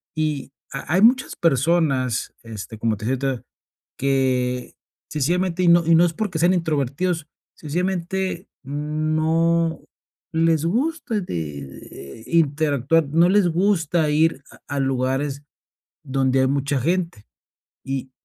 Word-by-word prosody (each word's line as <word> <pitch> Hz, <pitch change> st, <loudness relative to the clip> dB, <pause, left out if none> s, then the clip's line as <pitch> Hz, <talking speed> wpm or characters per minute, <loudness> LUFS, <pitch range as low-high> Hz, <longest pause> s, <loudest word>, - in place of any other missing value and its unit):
Y 155 Hz, -4 st, -2 dB, 0.2 s
ha 135 Hz, +3 st, -4 dB
hay 185 Hz, -, +3 dB
muchas 250 Hz, +4 st, +4 dB
personas, 140 Hz, -5 st, +1 dB
este, 110 Hz, 0 st, -8 dB
como 110 Hz, -1 st, +1 dB
te 105 Hz, -, -7 dB
decia 130 Hz, +3 st, 0 dB
ahorita, 130 Hz, -3 st, -4 dB, 0.5 s
que 130 Hz, -2 st, 0 dB, 0.3 s
sencillamente 175 Hz, +5 st, 0 dB
y -, -, +3 dB
no 170 Hz, -1 st, +5 dB
y 165 Hz, 0 st, +5 dB
no 170 Hz, +2 st, +6 dB
es 170 Hz, -, -1 dB
porque 185 Hz, -3 st, -3 dB
sean 175 Hz, +3 st, +4 dB
introvertidos, 160 Hz, 0 st, -1 dB, 0.3 s
sencillamente 180 Hz, +3 st, -2 dB, 0.2 s
no 155 Hz, +3 st, 0 dB, 0.5 s
les 160 Hz, -1 st, +2 dB
gusta 260 Hz, -, -1 dB
de -, -, -5 dB
de 75 Hz, -, -7 dB
interactuar, 155 Hz, -1 st, +2 dB
no 165 Hz, +4 st, +4 dB
les 195 Hz, -2 st, +4 dB
gusta 170 Hz, -3 st, +1 dB
ir 155 Hz, -2 st, +2 dB
a 140 Hz, -, -9 dB
a -, -, +1 dB
lugares 135 Hz, +2 st, -1 dB, 0.6 s
donde 135 Hz, -2 st, +1 dB
hay 130 Hz, -, +3 dB
mucha 140 Hz, 0 st, 0 dB
gente, 165 Hz, -, -1 dB, 0.6 s
y 135 Hz, -1 st, -4 dB
155 Hz, 130 wpm, -22 LUFS, 135-170 Hz, 0.6 s, no